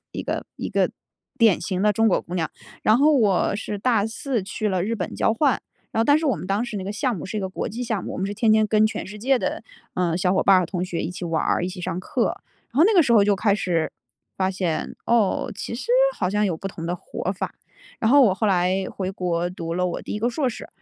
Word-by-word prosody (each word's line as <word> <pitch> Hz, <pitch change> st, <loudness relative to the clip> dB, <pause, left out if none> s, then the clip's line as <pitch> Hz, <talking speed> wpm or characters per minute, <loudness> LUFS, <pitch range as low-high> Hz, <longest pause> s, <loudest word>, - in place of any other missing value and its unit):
一 -, -, -4 dB
个 -, -, -3 dB
一 -, -, -4 dB
个 -, -, +1 dB, 0.5 s
典 225 Hz, -5 st, +4 dB
型 185 Hz, +1 st, -2 dB
的 210 Hz, 0 st, +4 dB
中 225 Hz, +2 st, +2 dB
国 190 Hz, -, +2 dB
姑 175 Hz, -, -8 dB
娘。 165 Hz, -3 st, 0 dB, 0.3 s
然 215 Hz, -, +5 dB
后 300 Hz, +2 st, +5 dB
我 205 Hz, -4 st, +2 dB
是 210 Hz, -1 st, -4 dB
大 225 Hz, -2 st, +2 dB
4 230 Hz, 0 st, -2 dB
去 205 Hz, +2 st, -2 dB
了 185 Hz, -3 st, 0 dB
日 230 Hz, -, -1 dB
本 185 Hz, -5 st, -4 dB
交 -, -, +2 dB
换， 275 Hz, +1 st, +2 dB, 0.3 s
然 -, -, -2 dB
后 -, -, +3 dB
但 290 Hz, +3 st, +5 dB
是 320 Hz, -, -4 dB
我 265 Hz, -7 st, +2 dB
们 -, -, -7 dB
当 200 Hz, +4 st, 0 dB
时 235 Hz, -3 st, -5 dB
那 190 Hz, -, -4 dB
个 200 Hz, -, -3 dB
项 235 Hz, +4 st, 0 dB
目 160 Hz, -, -6 dB
是 190 Hz, -, -5 dB
一 -, -, -1 dB
个 190 Hz, -, -2 dB
国 185 Hz, -, -4 dB
际 230 Hz, +3 st, -5 dB
项 220 Hz, -5 st, -2 dB
目， -, -, -5 dB
我 -, -, -5 dB
们 190 Hz, -, -1 dB
是 200 Hz, -, -3 dB
天 220 Hz, +1 st, +3 dB
天 215 Hz, 0 st, +4 dB
跟 215 Hz, 0 st, +4 dB
全 215 Hz, -, -4 dB
世 210 Hz, +2 st, -9 dB
界 260 Hz, +4 st, +2 dB
的， -, -, -3 dB, 0.3 s
嗯， 175 Hz, -2 st, 0 dB
小 180 Hz, 0 st, +1 dB
伙 -, -, +2 dB
伴 190 Hz, -2 st, +6 dB
和 180 Hz, -, -1 dB
同 180 Hz, 0 st, -2 dB
学 175 Hz, -2 st, -3 dB
一 -, -, -3 dB
起 180 Hz, 0 st, -6 dB
玩 165 Hz, -2 st, 0 dB
儿、 -, -, +1 dB
一 -, -, -2 dB
起 185 Hz, 0 st, -7 dB
上 180 Hz, 0 st, -3 dB
课。 -, -, -1 dB, 0.3 s
然 -, -, -3 dB
后 320 Hz, -, +7 dB
那 435 Hz, -, +4 dB
个 355 Hz, -, +7 dB
时 265 Hz, -, -1 dB
候 210 Hz, -3 st, +6 dB
就 205 Hz, 0 st, +3 dB
开 200 Hz, +1 st, +2 dB
始 175 Hz, -5 st, 0 dB, 0.5 s
发 190 Hz, 0 st, +1 dB
现， 185 Hz, -4 st, -2 dB
哦， 230 Hz, -4 st, +2 dB
其 205 Hz, -, -5 dB
实 240 Hz, -, -6 dB, 0.3 s
好 -, -, 0 dB
像 210 Hz, +1 st, +1 dB
有 180 Hz, -, 0 dB
不 195 Hz, -, -5 dB
同 165 Hz, -3 st, -8 dB
的 175 Hz, -, -1 dB
活 185 Hz, -, -4 dB
法， 190 Hz, -, -5 dB, 0.4 s
然 220 Hz, -, +1 dB
后 285 Hz, +2 st, +7 dB
我 200 Hz, -7 st, +4 dB
后 215 Hz, -, 0 dB
来 185 Hz, 0 st, +2 dB
回 190 Hz, -1 st, -3 dB
国 175 Hz, -2 st, -1 dB
读 165 Hz, -2 st, -5 dB
了 180 Hz, +1 st, +1 dB
我 175 Hz, -, -4 dB
第 -, -, -6 dB
1 -, -, -2 dB
个 230 Hz, +3 st, +1 dB
硕 265 Hz, +3 st, -1 dB
士， 230 Hz, -, -7 dB
200 Hz, 295 characters per minute, -23 LUFS, 180-225 Hz, 0.5 s, 后